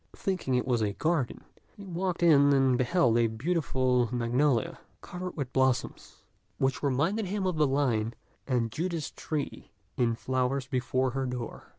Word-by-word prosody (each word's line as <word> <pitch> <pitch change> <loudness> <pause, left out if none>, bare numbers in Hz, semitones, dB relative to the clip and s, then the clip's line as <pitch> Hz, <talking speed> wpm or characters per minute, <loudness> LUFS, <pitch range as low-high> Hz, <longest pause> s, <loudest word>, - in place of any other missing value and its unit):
Thinking 185 -9 -1
it 125 - +1
was 125 -3 +1
a 105 -2 0
garden, 155 -2 -1 0.3
he 200 - -10
walked 180 -1 -2
in 145 -4 +6
and 135 -2 +4
beheld 125 -2 +2
a 115 - +4
beautiful 130 -2 0
magnolia, 120 +1 +1 0.2
covered 180 0 -7
with 135 -4 -4
blossoms, 130 -1 -1 0.3
which 135 0 0
reminded 155 - 0
him 200 +1 -2
of 180 -3 0
the 150 -1 +4
line 120 -5 0 0.3
"And 120 -4 0
Judas 165 +2 -3
tree 150 -3 -5 0.3
in 115 -2 +2
flower 130 +3 0
before 130 0 0
her 135 +1 -2
door." 125 -2 -6
135 Hz, 155 wpm, -29 LUFS, 125-165 Hz, 0.3 s, in